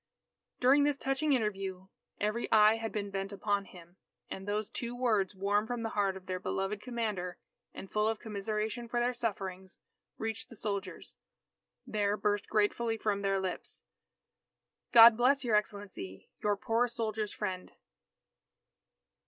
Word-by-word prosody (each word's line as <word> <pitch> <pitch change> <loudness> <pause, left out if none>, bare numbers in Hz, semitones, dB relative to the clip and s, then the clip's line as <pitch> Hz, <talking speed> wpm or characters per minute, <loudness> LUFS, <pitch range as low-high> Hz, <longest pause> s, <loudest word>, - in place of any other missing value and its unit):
During 270 +3 +5
this 290 -1 +2
touching 270 +3 +1
interview, 195 -6 -1 0.3
every 215 +3 -1
eye 215 +1 +6
had 225 -1 -4
been 205 -1 -3
bent 195 0 -3
upon 200 0 -1
him; 175 -1 -15 0.3
and 190 +1 -5
as - - +1
those 210 0 -1
two 240 0 -4
words 215 -6 +1
warm 205 +3 +1
from 240 -1 -3
the 225 - -1
heart 200 -3 0
of 185 - -13
their 185 -1 -3
beloved 195 +2 -2
commander 215 -7 -3 0.3
and 195 - -8
full 210 0 +2
of 225 0 0
commiseration 215 +2 -3
for 240 - 0
their 245 +1 +1
sufferings, 195 -5 -4 0.4
reached 225 -1 -4
the - - -11
soldiers, 200 -2 -5 0.7
there 205 -1 0
burst 205 -1 0
gratefully 225 +2 +1
from 205 -2 0
their 195 -1 +1
lips: 185 - -4 1.1
"God 230 -1 +10
bless 260 +4 +3
your 230 -4 +2
Excellency, 200 - -3
your 205 -1 +1
poor 230 +4 +1
soldiers' 220 -3 -2
friend!" 185 -3 -4
210 Hz, 150 wpm, -32 LUFS, 195-230 Hz, 1.1 s, God